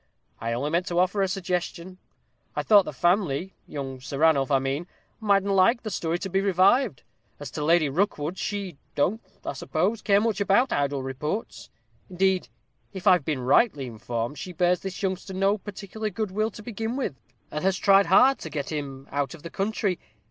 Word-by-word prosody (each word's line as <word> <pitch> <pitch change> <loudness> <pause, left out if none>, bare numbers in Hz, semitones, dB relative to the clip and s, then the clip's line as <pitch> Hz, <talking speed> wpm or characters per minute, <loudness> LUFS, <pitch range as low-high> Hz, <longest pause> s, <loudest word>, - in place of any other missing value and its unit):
I 115 +1 -2
only 140 +6 -2
meant 175 +2 +1
to 175 - -2
offer 185 +3 +2
a 195 - +3
suggestion. 185 -1 -3 0.6
I - - -1
thought 205 -3 +6
the - - -4
family, 180 -1 +1
young 135 -3 -5
Sir 135 +2 -6
Ranulph, 150 -3 +3
I 140 - +4
mean, 135 +5 -2 0.3
mightn't 200 -2 +2
like 195 +6 +4
the 215 - -4
story 170 -2 -1
to 195 - -4
be 190 +1 +1
revived. 195 - +3 0.4
As 145 -3 -7
to 150 - -4
Lady 165 0 +4
Rookwood, 165 +2 -1
she 200 -7 -3 0.2
don't, 200 +10 +1 0.2
I - - -2
suppose, 165 - -1
care 200 -1 +4
much 215 -2 0
about 235 +6 +3
idle 140 -1 0
reports. 150 - -4 0.4
Indeed, 190 0 +1 0.5
if 190 0 -7
I've 180 -5 +6
been 150 -5 -1
rightly 140 - +3
informed, 115 +3 -4
she 180 - -6
bears 180 0 +2
this 190 0 -6
youngster 190 0 -2
no 195 +2 +2
particular 205 +2 -5
good 210 0 -3
will 215 +3 0
to 210 - -11
begin 225 +1 -4
with, 265 - -2 0.4
and 150 - -4
has 190 -1 +2
tried 195 0 +5
hard 255 +9 +5
to 160 - -7
get 145 -1 -4
him 140 -3 -5
out 145 +3 -2
of 155 - -16
the 170 - -7
country. 200 -2 -1
180 Hz, 190 wpm, -26 LUFS, 145-200 Hz, 0.6 s, thought